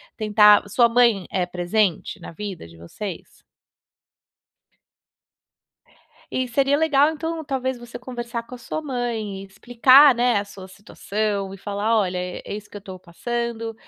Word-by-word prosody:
tentar 210 -1 +5
sua 235 +4 +4
mãe 230 -5 +3
é 185 -2 -1
presente 180 +1 -1
na - - -9
vida 190 - -7
de 85 0 -15
vocês? 170 - -9 2.9
E 255 - -1
seria 275 +3 +1
legal, 295 -2 +3
então, 320 +1 -4
talvez 260 -3 -3
você 240 0 -10
conversar 240 -1 -6
com 235 - -12
a - - -10
sua 275 +6 -5
mãe 235 -8 -4
e - - -10
explicar, 245 +7 +5
né, 240 -2 +2
a 200 - -3
sua 195 -2 -12
situação 200 0 -4
e - - -9
falar: 205 +3 -1
"Olha, 185 -3 -1
é 180 0 -5
é - - -6
isso 210 0 -8
que - - -12
eu - - -7
tô 190 -2 -9
passando, 230 +5 -4
220 Hz, 155 wpm, -22 LUFS, 195-245 Hz, 2.9 s, tentar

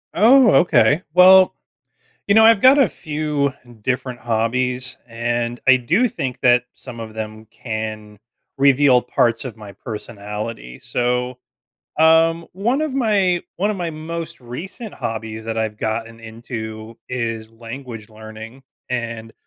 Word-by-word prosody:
Oh, 235 +3 +6
okay, 175 -2 +4
well, 185 +1 +7 0.7
you 200 - +4
know, 220 +1 +7
I've 225 -2 +6
got 270 +2 +7
a 240 -10 +4
few 150 -2 -2 0.3
different 125 -1 -2
hobbies, 125 +2 -1
and 120 +1 -2
I 130 - +8
do 170 - +2
think 130 - -4
that 125 -2 +4
some 120 -3 -11
of 110 -1 -8
them 110 0 -7
can 110 -2 -6 0.4
reveal 135 -2 +5
parts 115 0 0
of 125 - -6
my 105 -2 -11
personality, 105 - -7
so, 125 +1 -2 0.6
um, 165 +1 +4
one 235 - 0
of 310 -3 -2
my 200 -8 +2 0.2
one 200 +4 +1
of 210 - -2
my 175 -2 -3
most 165 +2 -6
recent 180 - -8
hobbies 110 0 -5
that 115 0 -3
I've 110 -1 -3
gotten 115 +1 -4
into 110 -1 -8
is 115 -3 -4
language 115 -1 -9
learning, 110 +3 -11 0.3
and 115 -2 -4
125 Hz, 135 wpm, -20 LUFS, 110-165 Hz, 0.7 s, I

